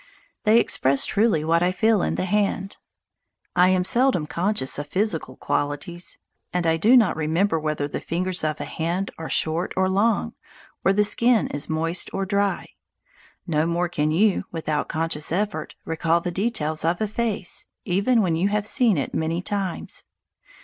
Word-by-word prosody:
They 220 Hz, +2 st, +6 dB
express 135 Hz, -, +2 dB
truly 205 Hz, -7 st, +2 dB
what 165 Hz, +1 st, +2 dB
I 180 Hz, +1 st, +2 dB
feel 210 Hz, +2 st, +2 dB
in -, -, -1 dB
the -, -, -1 dB
hand. 195 Hz, 0 st, -1 dB, 0.8 s
I 180 Hz, +1 st, +5 dB
am 185 Hz, -1 st, +2 dB
seldom 240 Hz, -, +2 dB
conscious 170 Hz, -3 st, 0 dB
of 145 Hz, -, -5 dB
physical 175 Hz, -7 st, -1 dB
qualities, 145 Hz, +5 st, -3 dB, 0.3 s
and 180 Hz, -1 st, -1 dB
I 165 Hz, 0 st, +3 dB
do 230 Hz, +10 st, +5 dB
not 220 Hz, -6 st, +3 dB
remember 160 Hz, +3 st, +1 dB
whether 150 Hz, -2 st, -2 dB
the -, -, -5 dB
fingers 180 Hz, +1 st, -2 dB
of 155 Hz, -1 st, -1 dB
a -, -, -3 dB
hand 175 Hz, +4 st, -3 dB
are 160 Hz, -, -5 dB
short 160 Hz, +3 st, 0 dB
or 190 Hz, 0 st, +3 dB
long, 200 Hz, +3 st, +1 dB, 0.5 s
or 190 Hz, -, +4 dB
the 210 Hz, +1 st, +3 dB
skin 235 Hz, +2 st, +3 dB
is 145 Hz, 0 st, -4 dB
moist 165 Hz, +2 st, 0 dB
or 195 Hz, -, -1 dB
dry. 200 Hz, +1 st, -1 dB, 0.8 s
No 160 Hz, -2 st, +1 dB
more 170 Hz, +1 st, 0 dB
can 150 Hz, -3 st, 0 dB
you, 195 Hz, +6 st, +2 dB
without 155 Hz, -3 st, -2 dB
conscious 160 Hz, -2 st, -1 dB
effort, 185 Hz, -3 st, -2 dB
recall 165 Hz, +1 st, +1 dB
the 175 Hz, +1 st, -4 dB
details 170 Hz, -6 st, -1 dB
of 170 Hz, +2 st, +1 dB
a 215 Hz, -, 0 dB
face, 215 Hz, -3 st, -3 dB, 0.2 s
even 205 Hz, +6 st, +2 dB
when 170 Hz, -3 st, +1 dB
you 175 Hz, +4 st, +1 dB
have 205 Hz, 0 st, -1 dB
seen 225 Hz, -, +3 dB
it 140 Hz, -, -3 dB
many 160 Hz, +1 st, -1 dB
times. 195 Hz, -3 st, -3 dB
180 Hz, 170 wpm, -23 LUFS, 160-205 Hz, 0.8 s, They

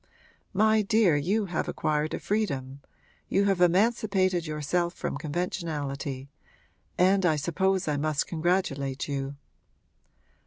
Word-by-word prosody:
My 215 Hz, +2 st, +4 dB
dear, 210 Hz, -5 st, +3 dB
you 195 Hz, +9 st, +1 dB
have 175 Hz, -3 st, -2 dB
acquired 150 Hz, 0 st, -1 dB
a -, -, -5 dB
freedom 140 Hz, -11 st, -2 dB, 0.5 s
you 200 Hz, -, +2 dB
have 195 Hz, -3 st, +1 dB
emancipated 185 Hz, -2 st, +2 dB
yourself 170 Hz, +3 st, -1 dB
from -, -, -3 dB
conventionality 145 Hz, -4 st, -3 dB, 0.7 s
and 190 Hz, +2 st, +4 dB
I 170 Hz, -3 st, +3 dB
suppose 190 Hz, +5 st, 0 dB
I 150 Hz, -1 st, 0 dB
must 150 Hz, 0 st, 0 dB
congratulate 155 Hz, -6 st, -1 dB
you.' 140 Hz, -1 st, -3 dB
170 Hz, 115 wpm, -27 LUFS, 145-195 Hz, 0.7 s, My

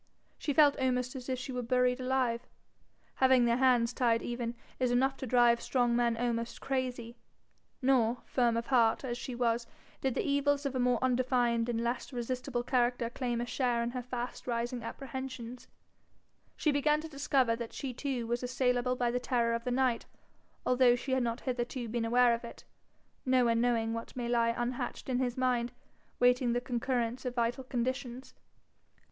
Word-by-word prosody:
She 295 Hz, -, -1 dB
felt 290 Hz, 0 st, +5 dB
almost 250 Hz, 0 st, 0 dB
as 255 Hz, 0 st, -7 dB
if 255 Hz, -, 0 dB
she 260 Hz, +1 st, -6 dB
were 250 Hz, -1 st, -2 dB
buried 250 Hz, +1 st, +1 dB
alive. 255 Hz, -2 st, 0 dB, 0.7 s
Having 260 Hz, -2 st, +5 dB
their 235 Hz, 0 st, +2 dB
hands 250 Hz, -2 st, +3 dB
tied 235 Hz, -3 st, +2 dB
even, 240 Hz, -1 st, -3 dB, 0.2 s
is 255 Hz, -1 st, +2 dB
enough 265 Hz, +2 st, +2 dB
to 260 Hz, -, -5 dB
drive 240 Hz, -1 st, +4 dB
strong 245 Hz, -2 st, +1 dB
men 235 Hz, -1 st, +2 dB
almost 235 Hz, 0 st, -2 dB
crazy. 250 Hz, -3 st, -3 dB, 0.7 s
Nor, 250 Hz, -2 st, +2 dB
firm 240 Hz, -3 st, +1 dB
of 230 Hz, -, -2 dB
heart 235 Hz, -3 st, +3 dB
as 245 Hz, -2 st, -3 dB
she 245 Hz, +1 st, -6 dB
was, 235 Hz, -1 st, 0 dB, 0.3 s
did 265 Hz, -3 st, 0 dB
no -, -, +1 dB
evils 285 Hz, 0 st, +1 dB
of 275 Hz, -, -1 dB
a 260 Hz, -, -1 dB
more 250 Hz, -1 st, +3 dB
undefined 245 Hz, -2 st, +1 dB
and 230 Hz, -1 st, 0 dB
less 240 Hz, +4 st, -2 dB
resistible 250 Hz, 0 st, -3 dB
character 245 Hz, -1 st, +1 dB
claim 240 Hz, -2 st, -2 dB
a -, -, -2 dB
share 245 Hz, -1 st, 0 dB
in 235 Hz, -, -2 dB
her 250 Hz, 0 st, -4 dB
fast 245 Hz, 0 st, -6 dB
rising 240 Hz, +1 st, -2 dB
apprehensions; 255 Hz, 0 st, -7 dB, 0.9 s
she 305 Hz, -, +2 dB
began 300 Hz, +1 st, +2 dB
to 320 Hz, -, -7 dB
discover 275 Hz, -5 st, +1 dB
that 230 Hz, -1 st, -6 dB
she 265 Hz, -2 st, -5 dB
too 255 Hz, -2 st, -3 dB
was 240 Hz, +1 st, -1 dB
assailable 250 Hz, 0 st, 0 dB
by 245 Hz, -1 st, 0 dB
the 250 Hz, -, 0 dB
terror 240 Hz, -2 st, +1 dB
of 230 Hz, 0 st, -3 dB
the -, -, 0 dB
night, 250 Hz, -1 st, +1 dB, 0.6 s
although 250 Hz, -1 st, +5 dB
she 255 Hz, +2 st, -5 dB
had 260 Hz, 0 st, +2 dB
not 235 Hz, 0 st, -2 dB
hitherto 245 Hz, -1 st, -3 dB
been 230 Hz, +1 st, -2 dB
aware 240 Hz, +1 st, +4 dB
of 235 Hz, -, -3 dB
it, 235 Hz, -, -10 dB, 0.6 s
no 255 Hz, -1 st, +3 dB
one 230 Hz, 0 st, +2 dB
knowing 230 Hz, -2 st, +1 dB
what 230 Hz, 0 st, -6 dB
may 245 Hz, -2 st, -3 dB
lie 235 Hz, -1 st, +2 dB
unhatched 240 Hz, +2 st, -3 dB
in 250 Hz, -1 st, +1 dB
his 245 Hz, -1 st, -1 dB
mind, 245 Hz, -2 st, +1 dB, 0.5 s
waiting 245 Hz, 0 st, +3 dB
the 245 Hz, -, +1 dB
concurrence 245 Hz, -1 st, -2 dB
of 250 Hz, -2 st, -4 dB
vital 240 Hz, +2 st, 0 dB
conditions. 255 Hz, 0 st, -3 dB
245 Hz, 180 wpm, -31 LUFS, 235-255 Hz, 0.9 s, felt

